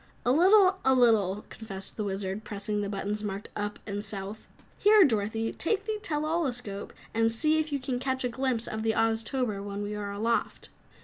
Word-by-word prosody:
"A 245 - +4
little, 375 +5 +5
a 265 0 +4
little," 215 -5 +3
confessed 195 -4 -6
the 215 - -2
Wizard, 195 +1 -3
pressing 210 0 -3
the 200 - -2
buttons 205 +1 -3
marked 200 0 -4
"Up" 205 0 -3
and 205 -1 -4
"South". 200 0 -7 0.3
"Here, 420 -1 +7
Dorothy, 225 - 0
take 405 +4 -1
the 430 -1 -2
tell 305 -6 -2
all 325 0 +1
escope 215 -6 -3 0.2
and 225 0 +2
see 310 +7 +2
if 310 -1 -2
you 285 - +1
can 255 -2 -3
catch 260 0 -1
a 250 - 0
glimpse 245 -2 -1
of 220 - -4
the 220 0 +1
Oztober 225 -1 0
when 205 0 -4
we 205 +1 -4
are 205 -1 -4
aloft." 225 +3 -1
225 Hz, 195 wpm, -28 LUFS, 205-265 Hz, 0.3 s, Here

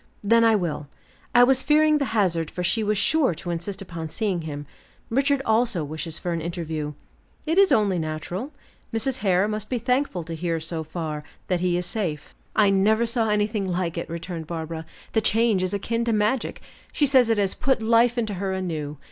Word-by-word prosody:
"Then 230 +3 +4
I 225 -1 +5
will; 165 -6 -2 0.5
I 245 - +8
was 260 +1 +4
fearing 305 +1 +4
the 280 - +1
hazard 170 -6 +1
for 180 - -4
she 220 +5 +1
is 210 -1 +1
sure 285 - +2
to 175 +2 -5
insist 185 +4 -4
upon 165 -3 -6
seeing 195 -2 -1
him. 145 -2 -6 0.5
Richard 275 +2 +2
also 220 -6 +2
wishes 155 +2 -4
for 175 - -3
an 165 - -2
interview." 160 -3 -4 0.5
"It 325 +4 +2
is 395 -1 +5
only 200 -5 +3
natural. 165 - -4 0.4
Mrs. 235 +3 -1
Hare 190 -4 +2
must 215 0 -4
be 255 - 0
thankful 250 -6 0
to 165 - -7
hear 165 0 -2
so 160 0 -4
far, 155 -2 -5 0.3
that 180 -2 +1
he 175 0 +1
is 180 - -1
safe." 175 -7 -3 0.2
"I 205 -2 +5
never 215 +4 +3
saw 230 -1 +1
anything 210 -1 0
like 175 -2 -1
it," 170 - -4
returned 170 -1 -5
Barbara; 160 -1 -5 0.3
"the 220 - +3
change 220 -2 +3
is 185 0 -1
akin 230 +4 -1
to 230 - +1
magic; 215 +4 0 0.3
she 295 - +2
says 260 -4 +5
it 225 - +3
has 200 -2 +2
put 260 -3 0
life 230 +2 +4
into 220 -3 -1
her 190 0 -2
anew. 160 -6 -3
195 Hz, 200 wpm, -24 LUFS, 170-230 Hz, 0.5 s, I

